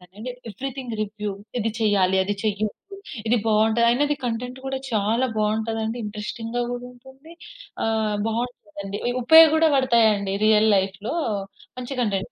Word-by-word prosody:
అండి. 225 Hz, +5 st, -6 dB, 0.2 s
Everything 255 Hz, +2 st, -6 dB
review 210 Hz, 0 st, -4 dB, 0.3 s
ఇది 225 Hz, 0 st, 0 dB
చేయాలి, 195 Hz, -4 st, +2 dB
అది 205 Hz, -, -1 dB
చెయ్యదు, 215 Hz, -, -3 dB, 0.3 s
ఇది 240 Hz, +2 st, +3 dB
బాగుంటది. 220 Hz, +2 st, +3 dB
ఆయనది 290 Hz, +5 st, +2 dB
కంటెంట్ 245 Hz, +2 st, -4 dB
గూడా 270 Hz, 0 st, -2 dB
చాలా 220 Hz, +4 st, +1 dB
బాగుంటది 220 Hz, +1 st, 0 dB
అండి. 225 Hz, +2 st, -3 dB
ఇంట్రెస్టింగ్‌గా 225 Hz, +3 st, -4 dB
గూడ 245 Hz, 0 st, -4 dB
ఉంటుంది. 265 Hz, +5 st, -16 dB, 0.5 s
ఆహ్, 220 Hz, -2 st, 0 dB
బాగుంటదండి. 205 Hz, -4 st, -5 dB
ఇ -, -, 0 dB
ఉపయోగ 320 Hz, +4 st, +9 dB
గూడ 320 Hz, -, +2 dB
పడతాయండి. 220 Hz, -7 st, +3 dB
రియల్ 215 Hz, 0 st, +5 dB
లైఫ్‌లో. 195 Hz, -, -2 dB, 0.6 s
మంచి 255 Hz, +2 st, -5 dB
కంటెంట్. 200 Hz, -5 st, -1 dB
225 Hz, 135 wpm, -23 LUFS, 210-245 Hz, 0.6 s, ఉపయోగ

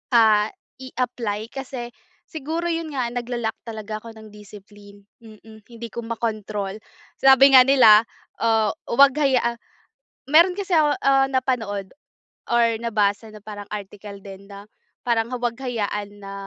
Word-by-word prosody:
ah, 215 Hz, -2 st, +5 dB, 0.3 s
i-apply 240 Hz, -4 st, -4 dB
kasi 255 Hz, -3 st, -7 dB, 0.4 s
siguro 320 Hz, +2 st, -4 dB
yun 330 Hz, -2 st, -4 dB
nga 255 Hz, -3 st, -1 dB
nagla-lack 240 Hz, -2 st, -4 dB
talaga 215 Hz, -1 st, -6 dB
ako 230 Hz, -1 st, -11 dB
ng 215 Hz, -1 st, -13 dB
discipline, 205 Hz, 0 st, -15 dB, 0.2 s
mm, 220 Hz, 0 st, -16 dB
hindi 235 Hz, 0 st, -8 dB
ko 235 Hz, -, -6 dB
makontrol 215 Hz, -3 st, -4 dB, 0.4 s
sabi 270 Hz, +1 st, +6 dB
nga 255 Hz, -, +10 dB
nila, 230 Hz, -5 st, +7 dB, 0.4 s
ah, 225 Hz, -2 st, +2 dB, 0.2 s
huwag 275 Hz, +3 st, +5 dB
hayaan 255 Hz, -4 st, +1 dB, 0.7 s
meron 340 Hz, +4 st, +5 dB
kasi 395 Hz, -3 st, -4 dB
ako, 295 Hz, -2 st, +3 dB
uh, 270 Hz, 0 st, +4 dB
napanood 225 Hz, -7 st, -2 dB, 0.6 s
or 235 Hz, -1 st, +3 dB
nabasa 215 Hz, -1 st, -1 dB
na 215 Hz, -, -12 dB
parang 205 Hz, -1 st, -9 dB
article 205 Hz, 0 st, -8 dB
din 195 Hz, 0 st, -11 dB
na 200 Hz, 0 st, -11 dB, 0.4 s
parang 230 Hz, -1 st, 0 dB
huwag 240 Hz, -1 st, -2 dB
hayaan 205 Hz, -4 st, -4 dB
na 195 Hz, 0 st, -9 dB
230 Hz, 135 wpm, -22 LUFS, 210-255 Hz, 0.7 s, nga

